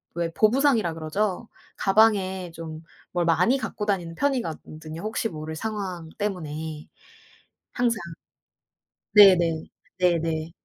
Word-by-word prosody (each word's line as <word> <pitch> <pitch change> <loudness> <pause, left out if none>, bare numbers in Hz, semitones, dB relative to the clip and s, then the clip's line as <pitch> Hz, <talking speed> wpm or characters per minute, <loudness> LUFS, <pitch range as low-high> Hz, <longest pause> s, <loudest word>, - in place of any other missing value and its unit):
왜 170 -1 -1
보부상이라 225 - +3
그러죠. 190 +7 -2 0.3
가방에 195 -3 +2
좀 160 -1 -8 0.3
뭘 175 -1 +1
많이 180 +10 +3
갖고 220 -4 -4
다니는 175 -5 -1
편이거든요 165 - -3
혹시 220 +1 -2
모를 155 0 -6
상황 190 -4 -4
때문에 160 -6 -4 0.9
항상. 240 -2 0 1.1
네네. 175 -6 +6 0.3
네네. 165 -2 0
180 Hz, 230 characters per minute, -25 LUFS, 160-215 Hz, 1.1 s, 네네